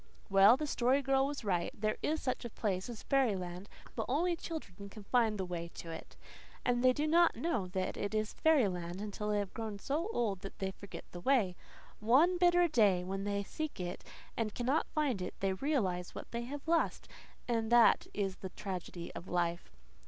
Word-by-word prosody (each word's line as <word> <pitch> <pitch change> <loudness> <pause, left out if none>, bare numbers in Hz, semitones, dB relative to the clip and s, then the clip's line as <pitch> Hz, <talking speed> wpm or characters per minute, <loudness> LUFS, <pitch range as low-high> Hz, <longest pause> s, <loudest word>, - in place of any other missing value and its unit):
Well, 200 +5 +7
the 305 - -2
Story 270 0 +2
Girl 270 0 +3
was 285 -3 -5
right. 180 -4 0
There 215 0 0
is 315 +1 0
such 255 -1 -2
a 235 - -5
place 195 -2 -2
as 235 -3 -7
fairyland 195 -8 0 0.3
but 225 -2 -2
only 340 +7 +2
children 200 - -7
can 210 +1 -11
find 225 0 +2
the 190 - -2
way 170 -1 -4
to 165 - -7
it. 160 - -9 0.5
And 245 0 +2
they 255 - +7
do 295 +4 -1
not 335 +2 +4
know 305 - -1
that 185 0 -2
it 205 +1 -2
is 215 0 -1
fairyland 190 - +2
until 210 0 -4
they 210 - +2
have 200 -2 -2
grown 220 -2 -4
so 305 - -2
old 215 - 0
that 195 0 -9
they 190 0 -2
forget 200 +1 -10
the 175 - -7
way. 215 -6 +2 0.4
One 295 +12 +4
bitter 350 0 +5
day, 205 - +3
when 195 +2 -3
they 200 0 -1
seek 310 +7 -5
it 180 0 -4 0.3
and 220 -2 -2
cannot 260 +6 +1
find 285 -10 0
it, 180 - -4
they 195 -1 +1
realize 190 - -1
what - - -8
they 235 0 -3
have 285 +4 -7
lost; 330 0 +1 0.4
and 230 -2 0
that 240 -1 +6
is 195 -2 -2
the 190 - -6
tragedy 180 -3 -6
of 180 - -8
life. 175 -1 -1
215 Hz, 195 wpm, -33 LUFS, 190-270 Hz, 0.5 s, Well